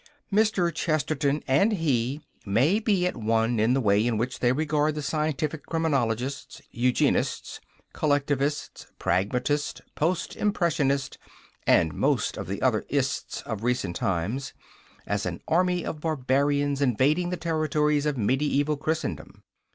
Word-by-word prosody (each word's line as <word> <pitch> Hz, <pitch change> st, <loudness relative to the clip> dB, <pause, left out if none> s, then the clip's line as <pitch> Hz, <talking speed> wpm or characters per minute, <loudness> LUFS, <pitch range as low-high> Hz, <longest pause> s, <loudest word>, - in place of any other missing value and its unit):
Mr. 200 Hz, -5 st, +2 dB
Chesterton 150 Hz, -2 st, 0 dB
and 145 Hz, +12 st, +3 dB
he 140 Hz, -, 0 dB, 0.2 s
may 130 Hz, -, +2 dB
be 205 Hz, -5 st, +1 dB
at 180 Hz, -, -1 dB
one 115 Hz, 0 st, +1 dB
in 115 Hz, +4 st, +3 dB
the -, -, +2 dB
way 105 Hz, -3 st, +3 dB
in 115 Hz, -3 st, 0 dB
which 125 Hz, +3 st, -2 dB
they 120 Hz, -, +3 dB
regard 150 Hz, +2 st, +1 dB
the 150 Hz, -, -3 dB
scientific 155 Hz, 0 st, -1 dB
criminologists, 140 Hz, -5 st, -1 dB
eugenists, 125 Hz, +1 st, 0 dB, 0.3 s
collectivists, 145 Hz, -1 st, -1 dB
pragmatists, 125 Hz, +10 st, 0 dB
post 170 Hz, +4 st, -1 dB
impressionists, 150 Hz, -9 st, 0 dB, 0.5 s
and 80 Hz, -2 st, +4 dB
most -, -, +1 dB
of -, -, -6 dB
the -, -, -4 dB
other -, -, +2 dB
"ists" -, -, -2 dB
of 110 Hz, -2 st, -5 dB
recent 115 Hz, -7 st, -1 dB
times, 100 Hz, +10 st, -2 dB, 0.5 s
as 100 Hz, -2 st, -1 dB
an 85 Hz, -1 st, -4 dB
army 180 Hz, +1 st, +2 dB
of 155 Hz, -, -5 dB
barbarians 145 Hz, -1 st, +1 dB
invading 140 Hz, +7 st, +2 dB
the 180 Hz, -, -2 dB
territories 150 Hz, -2 st, +1 dB
of 145 Hz, -2 st, -1 dB
mediaeval 140 Hz, +5 st, +1 dB
Christendom. 155 Hz, +2 st, -4 dB
145 Hz, 130 wpm, -26 LUFS, 125-155 Hz, 0.5 s, and